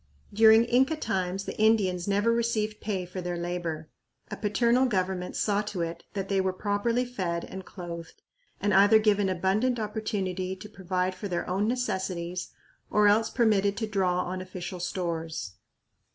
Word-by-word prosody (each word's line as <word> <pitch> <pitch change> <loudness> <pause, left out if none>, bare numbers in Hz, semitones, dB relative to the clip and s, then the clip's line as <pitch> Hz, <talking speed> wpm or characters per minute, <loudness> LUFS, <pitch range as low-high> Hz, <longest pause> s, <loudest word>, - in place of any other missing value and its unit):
During 220 +2 +7
Inca 260 +6 +3
times 190 -8 -2
the - - -5
Indians 200 -5 +3
never 205 +3 +2
received 225 -2 0
pay 195 -4 -2
for 180 +1 -6
their 175 0 -3
labor. 170 -2 -3 0.4
A - - -2
paternal 235 +5 +2
government 185 -4 -1
saw 205 -1 +1
to 205 -4 -4
it 170 0 -4
that 195 -1 -3
they 195 -1 +1
were 190 0 0
properly 210 +5 0
fed 180 -9 -3
and 190 0 -8
clothed 170 -3 -8 0.4
and 205 0 +1
either 200 +3 +7
given 205 -2 +2
abundant 195 +7 +1
opportunity 195 -4 -2
to 200 +3 -10
provide 185 -2 -2
for 185 +3 -6
their 175 -3 -2
own 195 +3 0
necessities 185 -7 -2 0.4
or 210 0 +4
else 220 +2 +4
permitted 205 -4 +2
to 225 - -1
draw 185 -4 +1
on 185 +1 -4
official 185 -1 -6
stores. 165 - -3
195 Hz, 160 wpm, -28 LUFS, 180-215 Hz, 0.4 s, During